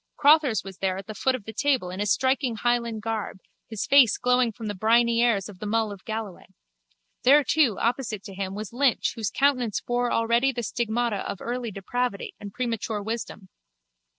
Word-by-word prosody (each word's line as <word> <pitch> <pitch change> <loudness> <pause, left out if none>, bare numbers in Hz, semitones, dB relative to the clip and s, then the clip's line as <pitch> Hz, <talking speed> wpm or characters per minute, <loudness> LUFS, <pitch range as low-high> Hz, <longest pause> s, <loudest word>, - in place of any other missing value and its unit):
Crotthers 290 - +4
was 190 -1 -10
there 190 -1 -1
at 195 - -7
the 215 - -7
foot 260 +5 +1
of 230 -6 -9
the 220 - -7
table 255 -7 0
in 185 - -7
his 205 0 0
striking 260 -2 +1
Highland 235 -1 -1
garb, 220 -3 -3 0.3
his 220 -3 -4
face 265 -6 +5
glowing 250 -1 +2
from 225 +1 -9
the 205 - -2
briny 230 +3 +3
airs 225 -5 +2
of 200 -4 -12
the 210 - -5
Mull 220 0 0
of 200 -2 -10
Galloway. 220 -4 -6 0.7
There 285 +4 +6
too, 275 -9 +2
opposite 235 -4 -1
to 200 - -9
him, 190 0 -4
was 215 +1 -6
Lynch 265 -1 +1
whose 220 -3 -2
countenance 255 -5 +1
bore 245 0 -1
already 235 +4 +2
the 240 -2 -4
stigmata 235 -1 -1
of - - -4
early 240 0 -4
depravity 205 +2 -3
and 205 -1 -8
premature 225 -2 -3
wisdom. 220 -3 -5
230 Hz, 190 wpm, -25 LUFS, 205-245 Hz, 0.7 s, There